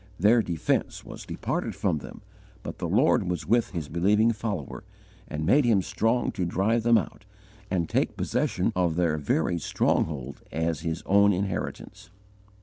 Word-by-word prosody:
Their 110 +6 +5
defence 85 -6 -2
was - - -10
departed - - -3
from 75 - 0
them, - - -11 0.4
but - - -7
the - - -3
Lord 90 - +3
was 90 -3 -3
with 120 0 +2
His 85 -5 -5
believing 105 +8 +3
follower, 105 -9 -5 0.4
and 75 +1 -4
made 145 - +4
him 110 -6 +3
strong 115 +6 0
to 95 - -3
drive 100 +7 +1
them 115 0 +4
out 110 0 -4 0.5
and 85 -3 0
take - - -1
possession - - 0
of 90 -3 +1
their 80 -3 +1
very 80 +4 0
stronghold 70 -3 -1
as 80 -1 -1
his 80 0 -4
own 100 +1 +5
inheritance. 100 +1 -4
90 Hz, 155 wpm, -26 LUFS, 80-110 Hz, 0.5 s, Their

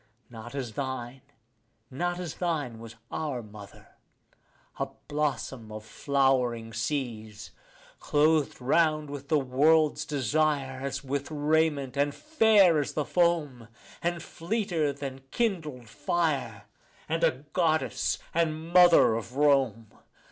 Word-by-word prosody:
Not 120 +2 -9
as 125 -5 -4
thine, 130 0 -5 0.7
not 175 +6 -2
as 175 -5 -5
thine 150 -10 -2
was 115 0 -10 0.2
our 145 -6 -3
mother, 105 -2 -13 0.9
a - - 0 0.2
blossom 135 -6 -2
of 110 0 -8
flowering 125 -3 0
seas, 110 -4 -4 0.5
Clothed 150 0 +2
round 155 +2 +2
with 140 -1 -7
the 155 - +3
world's 150 +4 +3
desire 140 -1 0
as 140 +1 -4
with 140 +1 -3
raiment, 150 -3 +1
and 145 0 +1
fair 220 - +4
as 145 - -2
the 150 - -1
foam, 155 -9 +1 0.3
And 175 0 -2
fleeter 170 -5 -1
than 135 -1 -7
kindled 155 - -2
fire, 140 -6 -1 0.4
and 165 +1 -1
a 150 -3 +1
goddess, 160 -3 +1 0.2
and 165 0 -1
mother 175 -10 +7
of 115 +2 -5
Rome. 135 -7 +2
145 Hz, 120 wpm, -28 LUFS, 125-160 Hz, 0.9 s, mother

